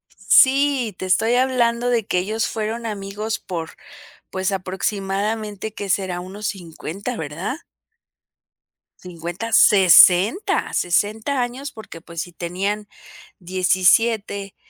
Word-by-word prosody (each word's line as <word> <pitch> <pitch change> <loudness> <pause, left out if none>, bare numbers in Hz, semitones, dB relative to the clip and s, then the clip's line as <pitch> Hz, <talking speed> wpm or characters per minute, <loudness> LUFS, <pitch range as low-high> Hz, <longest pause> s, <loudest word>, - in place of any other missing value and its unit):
Sí, 270 -5 +3
te 185 - -5
estoy 225 +6 +2
hablando 245 -2 +1
de 230 -4 +1
que 180 - 0
ellos 215 +5 -1
fueron 225 +2 -4
amigos 210 +1 -4
por 165 -3 -6 0.6
pues 190 +1 -1
aproximadamente, 200 +3 -3
¿que 200 -3 -6
será? 185 -2 -1
Unos 195 +3 -6
50, 195 +5 -6
¿verdad? 165 - -5 1.4
50, 180 +5 -6
60, 195 - +5
60 215 +9 0
años, 255 +3 -4
porque 205 -8 -11
pues 170 -1 -6
si 175 +1 -8
tenían 195 +5 -3 0.5
17, 195 +3 +1
200 Hz, 105 wpm, -21 LUFS, 185-225 Hz, 1.4 s, 60